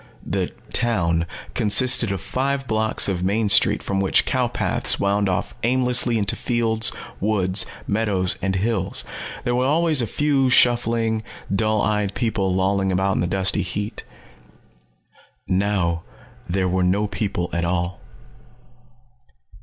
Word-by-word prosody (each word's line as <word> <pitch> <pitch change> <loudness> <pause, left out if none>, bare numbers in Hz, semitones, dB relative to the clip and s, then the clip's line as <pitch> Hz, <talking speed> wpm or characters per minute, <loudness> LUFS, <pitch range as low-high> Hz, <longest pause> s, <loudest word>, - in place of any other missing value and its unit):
The - - -2 0.2
'town' 85 -8 +1 0.3
consisted 115 +1 +4
of 95 -3 -3
five 135 +1 -2
blocks 110 0 +1
of 95 -3 -2
main 105 +3 +1
street - - +4
from 100 -1 -2
which 95 -1 +2
cow 130 -2 0
paths - - -1
wound 100 0 +1
off 90 -1 -2
aimlessly 125 -1 +3
into 100 -2 0
fields, 115 -2 0 0.3
woods, 95 -2 +1 0.2
meadows 100 -4 +1
and 95 0 -1
hills. 100 0 -1 0.4
There 120 - -1
was 125 +1 +1
always 155 -1 +3
a 115 - -1
few 140 +2 +1
shuffling, 115 -3 +2 0.3
dull 110 0 +1
eyed 105 -2 -1
people 110 -5 -1
lolling 95 +1 +1
about 95 +1 +1
in - - 0
the 85 - 0
dusty 95 +2 0
heat. 100 +4 -5 1.4
Now 95 -3 0 0.5
there 95 +1 0
were 90 +1 0
no 95 +4 +1
people 100 -4 -3
at 85 - -1
all. 90 +1 -2
105 Hz, 135 wpm, -22 LUFS, 95-115 Hz, 1.4 s, consisted